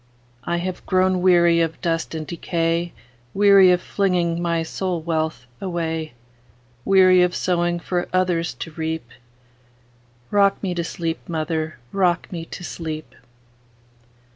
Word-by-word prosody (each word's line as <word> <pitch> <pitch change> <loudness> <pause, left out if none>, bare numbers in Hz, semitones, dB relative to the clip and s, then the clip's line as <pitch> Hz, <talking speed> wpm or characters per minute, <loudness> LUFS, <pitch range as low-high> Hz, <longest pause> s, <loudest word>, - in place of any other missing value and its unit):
I 175 - 0
have 180 +1 -4
grown 185 0 +2
weary 175 -2 +5
of 165 -1 -1
dust 165 -1 -2
and 155 -1 -4
decay,—Weary 170 +2 +2
of 180 0 +1
flinging 175 -4 0
my 170 -1 0
soul 180 +1 -3
wealth 160 -5 -2 0.2
away; 165 -5 -3 0.7
Weary 185 -2 +6
of 180 0 +2
sowing 175 -1 0
for 175 +1 -2
others 180 -2 0
to 165 - -7
reap;—Rock 120 - -4
me 185 -2 -1
to 175 -1 -2
sleep, 165 0 -3
mother,—rock 160 +2 -1
me 165 -3 -5
to 175 - -9
sleep! 155 -3 -6
170 Hz, 115 wpm, -22 LUFS, 155-180 Hz, 0.7 s, Weary